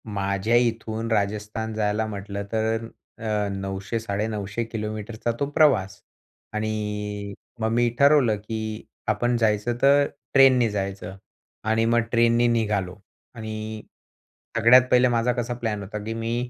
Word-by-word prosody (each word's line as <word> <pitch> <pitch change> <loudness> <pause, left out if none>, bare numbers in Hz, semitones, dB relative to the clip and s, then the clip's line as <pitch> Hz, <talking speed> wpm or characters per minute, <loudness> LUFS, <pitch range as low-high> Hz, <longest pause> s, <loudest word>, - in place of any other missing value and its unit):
माझ्या 100 +3 0
इथून, 115 -1 0
राजस्थान 105 +1 -1
जायला 105 0 0
म्हटलं 100 -1 -5
तर 110 +1 -1 0.3
अ, 105 -2 -1
900-950 100 +2 -3
किलोमीटरचा 110 +1 -4
तो 140 - +1
प्रवास 130 -12 +3 0.5
आणि 105 -1 -3 0.3
मग 110 0 0
मी 120 +1 +3
ठरवलं, 140 -6 +5
की 110 0 -5 0.2
आपण 120 0 +1
जायचं 110 +1 +1
तर 140 +1 +5 0.3
ट्रेननी 130 -4 +6
जायचं 95 -2 -4 0.5
आणि 115 +1 +2
मग 120 +1 +3
ट्रेननी 115 0 +4
निघालो. 105 -6 0 0.4
आणि 110 -1 -6 0.8
सगळ्यात 115 +3 +7
पहिले 125 0 +5
माझा 120 0 +2
कसा 120 0 -2
प्लॅन 110 -4 -3
होता, 105 +2 -6
की 110 +1 -4
मी 115 +2 -2
110 Hz, 125 wpm, -24 LUFS, 105-120 Hz, 0.8 s, सगळ्यात